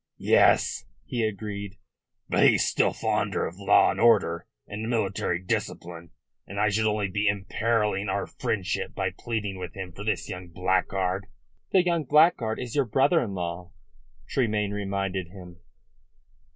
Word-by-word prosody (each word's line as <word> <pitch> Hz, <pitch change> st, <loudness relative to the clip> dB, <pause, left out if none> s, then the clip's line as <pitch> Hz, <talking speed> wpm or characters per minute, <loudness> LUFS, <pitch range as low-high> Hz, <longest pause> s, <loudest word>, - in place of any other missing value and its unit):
"Yes," -, -, +3 dB, 0.2 s
he 120 Hz, -2 st, -2 dB
agreed. 100 Hz, -2 st, -4 dB, 0.5 s
"But -, -, +1 dB
he's -, -, +3 dB
still -, -, +2 dB
fonder -, -, -1 dB
of 90 Hz, +4 st, -7 dB
law 100 Hz, -, +5 dB
and -, -, -5 dB
order 105 Hz, -8 st, +3 dB, 0.2 s
and 110 Hz, +2 st, -5 dB
military 100 Hz, -6 st, 0 dB
discipline, 85 Hz, -2 st, -4 dB, 0.4 s
and 100 Hz, +1 st, -6 dB
I 105 Hz, +1 st, +3 dB
should 110 Hz, +2 st, +1 dB
only 105 Hz, -1 st, 0 dB
be 105 Hz, +3 st, -1 dB
imperilling 105 Hz, 0 st, 0 dB
our -, -, -1 dB
friendship 100 Hz, -4 st, -3 dB
by 95 Hz, -2 st, -1 dB
pleading 105 Hz, -1 st, -4 dB
with 90 Hz, -2 st, -7 dB
him 95 Hz, -2 st, -6 dB
for 100 Hz, +4 st, -9 dB
this 110 Hz, -, -1 dB
young 90 Hz, -3 st, -7 dB
blackguard." 95 Hz, +2 st, -1 dB, 0.4 s
"The 185 Hz, -2 st, +4 dB
young 170 Hz, -3 st, +1 dB
blackguard 145 Hz, -6 st, +4 dB
is 125 Hz, 0 st, -5 dB
your 140 Hz, -2 st, +3 dB
brother 135 Hz, +9 st, +3 dB
in 100 Hz, -5 st, -4 dB
law," 90 Hz, 0 st, -5 dB, 0.5 s
Tremayne 105 Hz, -5 st, 0 dB
reminded 95 Hz, -2 st, -2 dB
him. 90 Hz, -2 st, -12 dB
100 Hz, 150 wpm, -26 LUFS, 95-110 Hz, 0.5 s, law